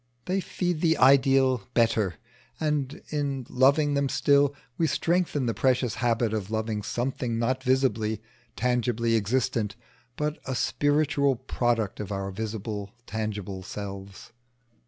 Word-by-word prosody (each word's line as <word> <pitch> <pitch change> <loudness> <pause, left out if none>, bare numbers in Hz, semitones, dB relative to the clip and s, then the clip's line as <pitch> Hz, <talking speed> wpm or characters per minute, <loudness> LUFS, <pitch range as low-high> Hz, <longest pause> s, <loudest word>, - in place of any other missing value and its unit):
They 185 +2 0
feed 175 -3 -2
the 165 -2 +3
ideal 135 -2 +5
Better, 110 -6 +2 0.4
and 150 -3 -1
in 140 -4 -2
loving 140 +3 +3
them 140 -1 +1
still, 140 0 +3 0.2
we 165 - +1
strengthen 165 -3 +1
the 115 - 0
precious 125 -2 +1
habit 115 -1 0
of 105 -3 -3
loving 110 -1 -2
something 120 +1 -2
not 130 +3 0
visibly, 120 -5 +1 0.4
tangibly 120 -1 +1
existent, 110 -1 0 0.4
but 150 +1 -2
a 130 - -2
spiritual 145 0 +2
product 120 -4 -1
of 105 -1 -5
our 95 0 -3
visible 105 0 -4 0.2
tangible 105 -3 -4
selves. 100 0 -8
125 Hz, 125 wpm, -27 LUFS, 110-140 Hz, 0.4 s, ideal